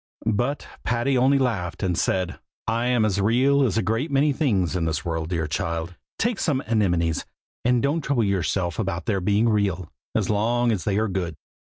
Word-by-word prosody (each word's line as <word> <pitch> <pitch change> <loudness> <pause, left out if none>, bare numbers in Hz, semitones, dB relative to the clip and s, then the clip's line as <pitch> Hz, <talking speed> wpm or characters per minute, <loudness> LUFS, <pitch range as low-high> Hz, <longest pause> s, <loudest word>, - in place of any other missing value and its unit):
But 120 +6 0 0.2
Patty 120 +3 +1
only 130 +2 +4
laughed 105 -10 -1
and 90 -2 +1
said, 90 +1 -1 0.3
"I 115 +2 0
am 120 -3 +3
as 100 -2 +1
real 130 +7 +3
as 115 -5 +1
a 110 - +2
great 115 - -1
many 140 +1 +3
things 100 - +1
in 85 -2 0
this 80 +1 -2
world, 80 -1 -2
dear 85 -2 -1
child! 85 +1 -3 0.2
Take 230 -2 0
some 140 -5 0
anemones, 90 -8 +1 0.4
and 125 +1 +2
don't 145 +4 +1
trouble 140 -5 +1
yourself 95 -2 0
about 95 -4 -2
their 100 -5 0
being 105 +5 +2
real, 100 -6 0 0.2
as - - +1
long 120 +3 +2
as 100 -6 -2
they 100 -1 +1
are 110 +1 +1
good." 90 -4 -3
105 Hz, 190 wpm, -24 LUFS, 90-125 Hz, 0.4 s, only